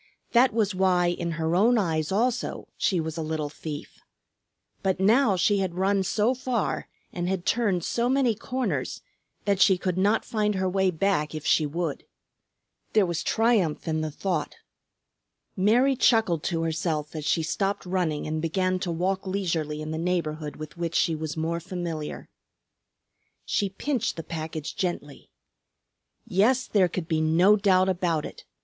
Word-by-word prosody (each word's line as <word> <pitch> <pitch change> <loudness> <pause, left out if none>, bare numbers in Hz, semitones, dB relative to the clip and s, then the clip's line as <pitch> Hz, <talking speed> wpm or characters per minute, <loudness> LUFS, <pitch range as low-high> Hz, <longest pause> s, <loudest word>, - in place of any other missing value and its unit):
That 250 +2 +5
was 210 -2 +1
why 185 -2 +3
in 170 -1 -2
her 165 0 -1
own 230 +6 +4
eyes 160 -6 0
also 240 +5 -1
she 185 -5 +1
was 160 0 -4
a - - -2
little 155 -1 -2
thief. 150 -1 -8 0.8
But 190 -1 0
now 215 +2 +4
she 195 +3 +2
had 185 -3 -2
run 195 +1 +2
so 210 +5 +1
far 255 -3 -2 0.3
and 175 0 -2
had 190 -2 -2
turned 205 -7 +1
so 235 +6 0
many 260 -3 +3
corners 250 +4 -3 0.4
that 200 -2 +1
she 190 - +6
could 180 0 -2
not 205 +4 +2
find 210 -2 0
her 190 0 0
way 190 0 +2
back 165 -3 0
if 155 - -6
she 155 - +3
would. 165 0 -3 0.9
There 215 -3 +5
was 170 -2 -2
triumph 225 -10 +1
in 160 -1 0
the 155 - -2
thought. 155 0 -3 1.0
Mary 240 +8 +3
chuckled 220 - +3
to 165 -2 -1
herself 160 -2 -2
as 155 - -4
she 160 +2 +1
stopped 195 +5 -1
running 180 -5 -1
and 155 0 -2
began 185 +3 0
to 180 - -3
walk 190 +3 -1
leisurely 165 -6 -2
in 155 - -5
the 160 - -3
neighborhood 160 -4 -2
with 155 +2 -9
which 170 -1 -2
she 165 - +3
was 155 0 -4
more 165 +1 -1
familiar. 170 -3 -5 1.2
She 200 - 0
pinched 235 +4 -2
the 165 - -6
package 155 -1 -5
gently. 175 -6 -4 1.0
Yes, 230 +5 +2
there 195 -4 +3
could 170 -1 -4
be 160 -2 +1
no 170 +6 +5
doubt 190 -2 +3
about 175 -4 0
it. - - -10
180 Hz, 165 wpm, -26 LUFS, 160-200 Hz, 1.2 s, she